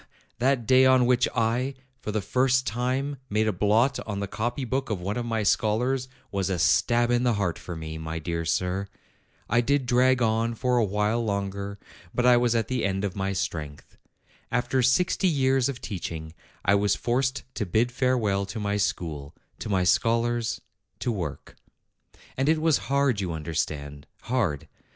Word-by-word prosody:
that 130 -1 +2
day 130 +3 +6
on 130 -1 +5
which 125 0 +3
I, 120 +4 0 0.2
for 105 - -4
the 110 0 -1
first 130 +5 +2
time, 130 +5 -1
made 110 +1 +1
a 110 - +1
blot 110 +8 +2
on 100 -2 -3
the 100 - -2
copy 120 +6 -3
book 130 +3 -2
of 105 -4 -1
one 100 +4 -3
of 120 -1 -3
my 110 -2 0
scholars 125 +6 +1 0.2
was 100 -1 -1
a 95 - 0
stab 120 +7 +3
in 120 0 +3
the 125 -1 +2
heart 95 -5 -1
for 90 - -7
me, 80 0 -6
my 80 0 -4
dear 85 +1 -3
sir. 90 +4 -1 0.6
I 115 +2 +3
did 140 +2 +1
drag 125 +1 +3
on 115 0 +1
for 125 +1 +1
a - - +3
while 105 +3 0
longer; 100 -1 -3 0.4
but 125 - +1
I 125 -1 +7
was 120 -1 +2
at 115 -1 +1
the 130 -3 -1
end 95 0 0
of 100 -3 -2
my 95 0 -1
strength. 75 -6 -5 0.6
After 125 +1 +1
sixty 175 +9 +2
years 135 -4 +2
of 130 -3 -5
teaching 80 -6 -5 0.3
I 100 - +4
was 100 0 +3
forced 130 +2 -1
to 105 - -3
bid 110 +7 +1
farewell 115 -7 +1
to 110 +3 -5
my 105 0 -1
school, 80 -8 -3 0.2
to - - -5
my 95 -3 +2
scholars, 115 +4 +1 0.4
to 120 - -1
work. 85 -10 -5 0.8
And 135 +3 +1
it 160 0 +3
was 160 -2 +3
hard, 140 -6 +2
you 90 -3 -2
under 80 +1 -5
stand, 75 -2 -3 0.2
hard. 105 - -1
115 Hz, 185 wpm, -26 LUFS, 95-125 Hz, 0.8 s, I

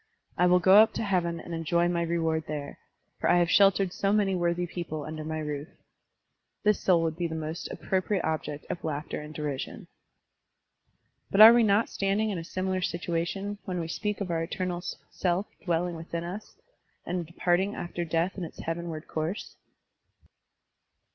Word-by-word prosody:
I 180 - +4
will 180 0 +6
go 190 +2 +6
up 220 +1 +7
to - - -2
heaven 175 -4 0
and 170 - -8
enjoy 170 +1 +1
my 175 -1 0
reward 165 -2 0
there, 145 -2 -5 0.4
for - - +1
I - - +5
have 175 0 +2
sheltered 195 -2 +4
so 195 - 0
many 205 -2 +2
worthy 175 0 0
people 170 -3 -5
tmder 155 +1 -6
my 155 0 -3
roof, 150 -1 -4 0.3
* - - -52
' - - -53
this 210 -1 +3
soul 175 -3 +4
would 160 -1 -1
be 175 0 -1
the 160 - -5
most 160 +2 -4
appro 190 -1 -1
priate 190 -1 -1
object 155 -2 -3
of 175 - -5
laughter 150 -1 -3
and 150 0 -9
derision. 150 -3 -4 1.4
But 200 - +4
are 225 +2 +12
we 240 - +5
not 215 0 +3
standing 200 +2 0
in 185 - -2
a - - -6
similar 185 +2 -2
situation 175 +3 -2
when 180 -2 -3
we 165 - -3
speak 210 +5 -3
of 185 -3 -2
our 165 -1 0
eternal 180 +1 -3 0.3
self 180 +2 0 0.2
dwelling 175 0 0
within 165 +1 -5
us 185 +5 -7 0.5
and 180 0 -2
departing 175 +4 0
after 175 0 -4
death 170 +3 -1
in - - -3
its 165 - -8
heavenward 165 -1 -4
course? 160 +6 -4
175 Hz, 180 wpm, -28 LUFS, 165-190 Hz, 1.4 s, are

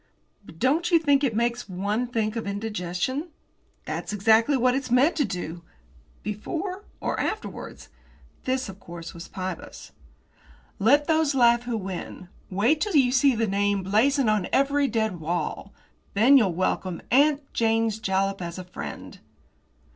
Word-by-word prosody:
"But 165 - -14
don't 295 - +1
you 340 - +6
think 290 -3 +2
it 245 -6 +1
makes 235 -1 -1
one 205 +6 -1
think 225 -2 -1
of 225 -3 -4
indigestion?" 205 - -3 0.6
"That's - - -4
exactly 220 +6 +3
what 250 0 +3
it's 265 -1 -2
meant 255 +7 +4
to 290 - +2
do." 175 -3 -5 0.6
"Before, 360 - -4
or - - -2
afterwards?" 435 - -5 0.6
This, 260 -1 -1
of 195 0 -10
course, 170 -2 -9
was 170 0 -9
Pybus. 185 -1 -7 0.9
"Let 280 +8 +4
those 315 -3 +2
laugh 240 -1 +4
who 240 -2 -2
win. 185 -2 -6 0.2
Wait 225 +11 +2
till 415 -5 -1
you 260 -4 +5
see 265 0 +4
the 225 0 +1
name 200 -1 0
blazoned 240 +7 +2
on 215 -4 +1
every 280 +1 +2
dead 220 -7 -1
wall. 170 +3 -3 0.4
Then 240 +7 +6
you'll 205 -10 +4
welcome 185 0 -1
'Aunt 285 +2 +3
Jane's 225 -1 +1
Jalap' 195 -1 0
as 170 0 -5
a 185 - -6
friend." 180 0 -8
225 Hz, 150 wpm, -25 LUFS, 195-275 Hz, 0.9 s, you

